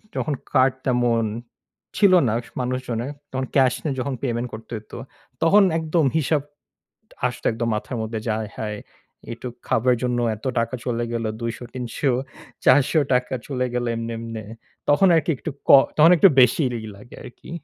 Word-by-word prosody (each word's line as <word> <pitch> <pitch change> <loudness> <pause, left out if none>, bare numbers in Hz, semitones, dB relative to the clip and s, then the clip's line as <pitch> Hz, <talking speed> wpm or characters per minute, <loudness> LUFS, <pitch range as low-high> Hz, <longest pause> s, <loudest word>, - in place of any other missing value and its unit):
যখন 150 - -1 0.2
card 130 0 +4
তেমন 120 -2 +2 0.7
ছিল 200 -3 +5
না 110 - +1
স - - -16
মানুষজনের, 125 0 -3 0.2
তখন 130 0 -2
cash 130 -3 +4
এ - - 0
যখন 135 +2 -2
payment 120 -1 -1
করতে 110 +2 -10
হইতো, 105 - -11 0.4
তখন 200 +5 +6
একদম 160 -1 +1
হিসাব 155 0 +1 0.9
আসতো 125 -1 -5
একদম 115 +1 -2
মাথার 110 +3 -4
মধ্যে 110 0 -4
যে, 115 - 0
আয়হায় 105 0 -5 0.5
এইটূক 120 +1 -7
খাবার 125 +3 +2
এর 120 - -5
জন্য 125 -1 0 0.2
এত 105 - -17
টাকা 115 +2 -1
চলে 120 -2 -1
গেলো 115 -1 -2
২০০, 115 0 -3 0.2
৩০০, 125 +2 -1 0.5
৳৪০০ 130 -1 +3
চলে 125 -3 -2
গেলো 120 0 -1
এমনে, 115 0 -4
এমনে। 115 -1 -6 0.5
তখন 145 +7 +5
আরকি 165 +1 +2
একটু 160 - -5 0.2
ক - - +2 0.3
তখন 155 +2 +7
একটু 195 - +7
বেশিই 125 +3 +4 0.2
ই - - -7
লাগে 105 +5 -14
আরকি। 125 - -12
125 Hz, 165 wpm, -23 LUFS, 115-140 Hz, 0.9 s, তখন